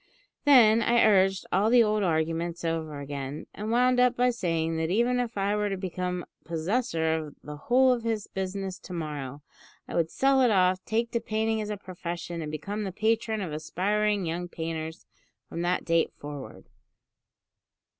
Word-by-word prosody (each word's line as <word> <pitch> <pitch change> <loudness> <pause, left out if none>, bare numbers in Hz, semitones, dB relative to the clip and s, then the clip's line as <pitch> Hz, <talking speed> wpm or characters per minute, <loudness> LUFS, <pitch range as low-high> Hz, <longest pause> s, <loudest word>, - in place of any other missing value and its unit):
Then 230 -6 +7
I 235 0 +4
urged 195 -2 +3
all 200 +4 +3
the 240 0 +6
old 215 -1 +1
arguments 165 0 -1
over 160 -3 -2
again, 140 0 -5
and 210 +2 -5
wound 250 +2 +3
up 250 0 +4
by 250 0 +3
saying 165 -7 -1
that 160 0 -1
even 240 +6 +2
if 240 -3 -3
I 200 +1 +1
were 210 0 0
to 195 - -2
become 180 -1 -3 0.2
possessor 165 0 0
of 155 -2 -4
the 150 - -7
whole 250 - +4
of 240 - -3
his 225 -2 -2
business 190 0 -4
to 180 - -10
morrow, 145 -4 -5 0.4
I - - -8
would 165 -1 +1
sell 270 +5 +3
it 250 - +5
off, 185 -2 +3
take 230 +1 0
to 235 - 0
painting 220 0 -1
as 210 - -4
a 210 - -3
profession, 175 -2 -6
and 150 -1 -5
become 205 +7 -4
the 195 - -3
patron 220 +2 0
of 170 -6 -4
aspiring 200 +5 0
young 170 +2 -3
painters 160 -1 -5 0.4
from 170 - -5
that 175 +1 0
date 165 -1 +2
forward! 145 -2 -8
190 Hz, 175 wpm, -27 LUFS, 165-220 Hz, 0.4 s, Then